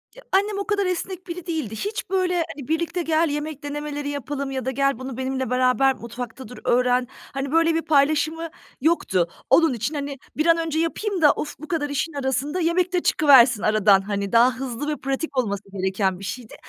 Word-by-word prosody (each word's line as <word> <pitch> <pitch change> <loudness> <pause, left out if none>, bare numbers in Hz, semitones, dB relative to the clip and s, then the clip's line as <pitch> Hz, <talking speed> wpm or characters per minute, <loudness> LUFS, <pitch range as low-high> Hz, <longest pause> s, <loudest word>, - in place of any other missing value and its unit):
Ya, - - -13
annem 400 +2 +2
o 400 - -3
kadar 410 -2 +1
esnek 365 +1 -3
biri 345 -1 -6
değildi. 310 -11 -3
Hiç 415 - -4
böyle, 370 -1 +1 0.2
hani, 280 -4 -9
birlikte 335 +3 -1
gel 325 0 +2
yemek 295 0 -4
denemeleri 290 0 -4
yapalım 280 0 -4
ya 260 -1 -3
da 260 - 0
gel 275 -1 +1
bunu 260 -1 -6
benimle 260 -1 -2
beraber 255 +1 +3
mutfakta 240 +2 -8
dur 250 - -11
öğren. 250 0 +2 0.3
Hani, 275 0 -3
böyle 330 +1 +3
bir 330 - +1
paylaşımı 310 +2 +2 0.3
yoktu. 220 - +2 0.2
Onun 320 +2 +5
için, 235 +6 -3
hani, 280 -1 -4 0.2
bir 310 - +1
an 335 0 +5
önce 325 -1 -1
yapayım 370 +3 -1
da, 295 -2 +7
of, 295 - -5
bu 310 - -9
kadar 305 -4 -1
işin 285 +3 -2
arasında 280 +4 -1
yemek 355 +2 +1
de 360 - +2
çıkıversin 260 -7 +6
aradan, 210 -2 +4
hani, 200 0 -3
daha 245 +2 +5
hızlı 260 +1 -4
ve 300 -1 -1
pratik 275 +2 -3
olması 200 -5 0
gereken 190 -1 -1
bir 195 - -7
şeydi. 235 +2 -7
285 Hz, 200 wpm, -23 LUFS, 250-325 Hz, 0.3 s, da